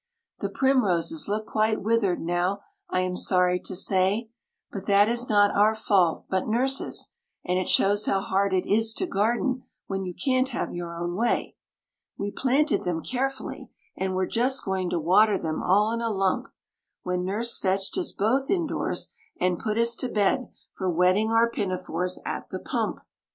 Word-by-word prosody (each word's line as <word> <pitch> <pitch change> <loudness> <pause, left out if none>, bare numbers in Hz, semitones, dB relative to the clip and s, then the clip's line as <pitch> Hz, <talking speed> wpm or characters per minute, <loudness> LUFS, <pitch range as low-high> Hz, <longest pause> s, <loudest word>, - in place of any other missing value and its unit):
The - - -2
primroses 190 - +1
look 215 +2 -2
quite 215 0 +1
withered 215 -4 +1
now, 175 +4 -1 0.3
I 185 - +1
am 185 0 -2
sorry 180 -1 +2
to 185 - -6
say, 195 +4 +1 0.4
But 200 -1 -7
that 200 0 +5
is 240 +2 0
not 205 -1 +4
our 215 +2 +4
fault 195 -6 +2
but 190 -1 -1
Nurse's, 260 +5 0 0.3
and 180 0 +1
it 185 - -2
shows 205 +2 +3
how 195 - +2
hard 195 0 0
it 185 -1 +1
is 225 +2 +2
to 370 - -1
garden 240 - 0 0.2
when 195 -1 -3
you 180 -2 -5
can't 260 -1 +1
have 245 - -3
your 170 -1 -5
own 175 +1 -3
way. 235 +4 0 0.6
We 200 0 -3
planted 275 +6 +1
them 170 -2 -2
carefully, 265 +1 -3 0.3
and 190 0 -2
were 185 0 +1
just 250 +7 +1
going 190 -2 -1
to 175 - -1
water 195 +6 +4
them 160 -3 -3
all 210 +4 +3
in 230 0 -2
a 230 - 0
lump, 195 -3 0 0.6
When 180 0 -1
Nurse 215 +5 -1
fetched 190 0 0
us 355 - -2
both 255 +7 0
indoors, 345 -5 -1 0.3
and 180 -1 +1
put 215 -1 -2
us 235 0 +3
to 255 - -2
bed 220 +5 +1 0.2
for 190 -1 -2
wetting 180 +5 +3
our 225 +1 +4
pinafores 185 -4 -3
at - - -4
the - - -4
pump. - - -3
200 Hz, 175 wpm, -26 LUFS, 185-230 Hz, 0.6 s, that